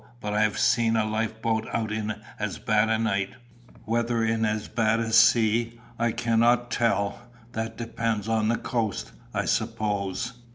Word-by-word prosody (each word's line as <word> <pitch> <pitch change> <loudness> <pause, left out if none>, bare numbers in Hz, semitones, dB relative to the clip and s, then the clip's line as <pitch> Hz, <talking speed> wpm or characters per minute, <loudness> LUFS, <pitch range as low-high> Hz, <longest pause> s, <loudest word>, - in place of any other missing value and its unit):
But 105 -2 -3
I 105 - +2
have 110 0 +1
seen 115 -2 +3
a 110 -1 +2
life 110 +1 -2
boat 110 -1 0
out 110 -2 -1
in 110 -1 -2 0.2
as 100 -2 -2
bad 110 0 +2
a 110 - +2
night 100 -2 -1 0.5
whether 115 0 0
in 115 0 +1
as 105 -1 -1
bad 110 0 +1
a 115 -1 -2
sea, 115 +1 +4 0.2
I 120 0 +2
cannot 120 +2 +2
tell: 115 0 0 0.2
that 110 0 -4
depends 115 -2 -2
on 110 -1 +1
the 115 +1 +2
coast, 115 -5 -2 0.2
I - - -1
suppose." 110 -1 -1
110 Hz, 165 wpm, -26 LUFS, 110-115 Hz, 0.5 s, sea